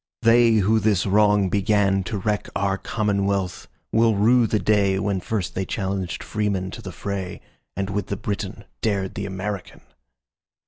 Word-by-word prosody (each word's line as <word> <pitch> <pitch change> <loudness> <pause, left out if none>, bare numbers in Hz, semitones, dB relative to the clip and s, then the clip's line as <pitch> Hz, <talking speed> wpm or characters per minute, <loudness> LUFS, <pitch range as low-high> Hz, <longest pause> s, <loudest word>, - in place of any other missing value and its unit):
They 115 0 +6
who 110 +1 +3
this 105 -3 +2
wrong 105 0 +4
beganTo 100 -1 +1
wreck 105 -1 0
our 100 -1 +1
commonwealth, 100 -3 -1 0.2
will 115 -1 +3
rue 115 +4 +4
the 110 - +1
dayWhen 100 -2 +1
first 90 -4 -2
they 95 - -1
challenged 95 -3 -3
freemen 100 -3 -2
to 115 - -8
the 95 - -7
fray, 95 +1 -5 0.4
And 100 +1 -2
with 105 0 -2
the 100 - -3
Briton 100 -1 -4 0.2
dared 100 -4 -1
the 100 +1 -4
American. 95 0 -5
100 Hz, 145 wpm, -23 LUFS, 95-105 Hz, 0.4 s, They